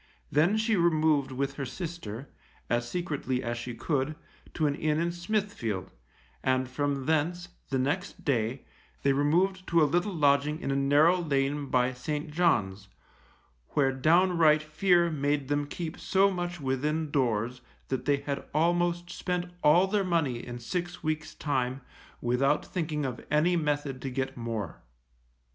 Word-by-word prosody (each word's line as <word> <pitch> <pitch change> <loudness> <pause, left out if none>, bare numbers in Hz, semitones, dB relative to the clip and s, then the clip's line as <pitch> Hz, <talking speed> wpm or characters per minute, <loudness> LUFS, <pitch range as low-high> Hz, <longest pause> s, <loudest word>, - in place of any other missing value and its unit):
Then 165 +9 +3
she 220 0 +2
removed 155 -5 +2
with 135 +1 -2
her 140 - -2
sister, 140 - -6 0.4
as 120 0 0
secretly 145 -7 -2
as 120 0 -2
she 120 0 -6
could, 145 +2 -1 0.4
to 160 - +1
an 145 - +2
inn 155 +1 0
in 170 +1 0
Smithfield, 175 - -2 0.5
and 130 0 +1
from 140 +1 -2
thence, 170 +3 0 0.2
the 135 - 0
next 145 +9 -2
day, 125 -2 0 0.4
they 140 - +4
removed 180 +7 +1
to 170 - +3
a - - +6
little 175 +7 +1
lodging 145 0 +3
in 135 -1 0
narrow 160 +5 +5
lane 140 -2 0
by 125 0 +2
St. 150 +5 -4
John's, 105 - +1 0.9
where 135 -2 +3
downright 160 +2 +4
fear 170 +2 +3
made 145 -2 -1
them 145 0 0
keep 165 +2 -5
so 195 +1 +3
much 175 -1 -3
within 150 +3 -1
doors 125 -3 0 0.3
that 130 -1 -2
they 145 -1 +3
had 140 0 -4
almost 175 +2 +1
spent 180 -1 -3
all 165 +5 +6
their 200 +1 +1
money 160 -10 0
in 120 0 -6
six 175 +9 -4
weeks' 155 0 -2
time, 130 -2 -1 0.4
without 135 +5 +2
thinking 155 -4 -2
of 125 -2 -4
any 160 +4 +3
method 145 -4 -1
to 135 - -3
get 130 +1 -3
more. 115 -6 -4
150 Hz, 150 wpm, -29 LUFS, 130-170 Hz, 0.9 s, a